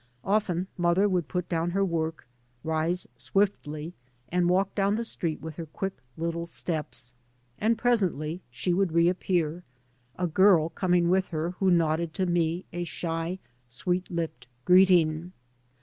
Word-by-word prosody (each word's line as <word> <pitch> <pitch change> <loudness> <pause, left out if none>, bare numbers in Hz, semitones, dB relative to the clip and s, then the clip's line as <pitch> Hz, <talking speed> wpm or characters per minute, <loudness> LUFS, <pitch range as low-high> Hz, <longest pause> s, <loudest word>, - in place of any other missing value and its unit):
Often 190 -3 +1
mother 175 +4 +3
would 180 -6 0
put 180 -1 -2
down 165 0 0
her 195 +3 +1
work, 165 -2 -2 0.4
rise 160 +3 0
swiftly, 155 +1 -1 0.4
and 175 0 +2
walk 190 +2 +2
down 200 0 +2
the 230 +1 -2
street 165 -9 -3
with 160 0 -7
her 165 -2 -5
quick 190 +5 -4 0.2
little 170 +1 -2
steps. 155 -7 -4 0.5
And 225 +2 +2
presently 185 - +1
she 175 +9 -1
would 185 -2 +1
re 170 0 +4
appear, 175 -2 0 0.5
a 180 - -1
g^r] 170 -1 +4
coming 180 -2 +2
with 190 0 +2
her 165 +1 -2
who 190 - +3
nodded 165 -1 +2
to 190 - +1
me 175 0 0
a 175 0 -2
shy, 165 +1 -3 0.3
sweet 180 +9 -2
lipped 160 -8 -4 0.2
greeting. 180 -2 +4
175 Hz, 150 wpm, -27 LUFS, 160-185 Hz, 0.5 s, re